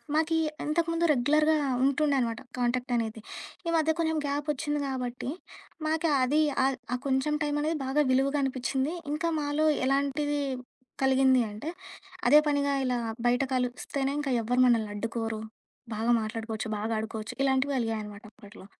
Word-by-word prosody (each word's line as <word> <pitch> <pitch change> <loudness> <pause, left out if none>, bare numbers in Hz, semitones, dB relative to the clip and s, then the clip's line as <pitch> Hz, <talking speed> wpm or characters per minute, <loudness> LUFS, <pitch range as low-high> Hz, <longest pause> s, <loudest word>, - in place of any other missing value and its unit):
మాకీ 320 +1 +2 0.3
ఇంతకుముందు 330 +2 +1
రెగ్యులర్‌గా 305 +4 +3 0.3
ఉంటుండే 280 +1 +2
అనమాట 230 -2 -1 0.2
కాంటాక్ట్ 245 0 0
అనేది. 225 -1 -2 0.5
ఈ - - +1
మధ్య 320 0 +3
కొంచెం 320 -1 +1
గ్యాపొచ్చింది 295 +1 -1
గాబట్టి, 250 -1 -3 0.6
మాక 320 +1 0 0.2
అది 295 +4 +3 0.2
ఆద్ 270 -1 +1 0.2
ఆ - - -1
కొంచెం 265 +2 +1
టైమనేది 295 +2 0
బాగా 280 +3 +2
విలువగా 275 +3 +2
అనిపిచ్చింది. 265 +3 -1 0.2
ఇంకా 325 +3 0
మాలో 295 +1 +1 0.2
ఎలాంటిది 280 +2 +1 0.6
కలిగింది 265 -1 +4
అంటే, 215 +10 -6 0.6
అదే 300 - +8
పనిగా 285 -1 +1
ఇలా 250 -1 +1 0.3
బయట 245 +2 +3
కలిస్తేనే 260 +2 -1
ఇంక 295 - -3 0.2
ఎవ్వరు 245 +3 +2
మమ్మల్ని 225 -3 +2
అడ్డుకోరు. 225 0 -3 0.5
బాగా 225 +3 +1
మాట్లాడుకోవచ్చు. 220 0 -4
బాగా 215 +2 -3
ఆడుకోవచ్చు. 220 0 -4
ఇలాంటివి 270 +1 +2
వెలిగాయనమాట 220 -3 -3
అప్పట్లో. 205 -2 -14
265 Hz, 135 wpm, -28 LUFS, 235-295 Hz, 0.6 s, అదే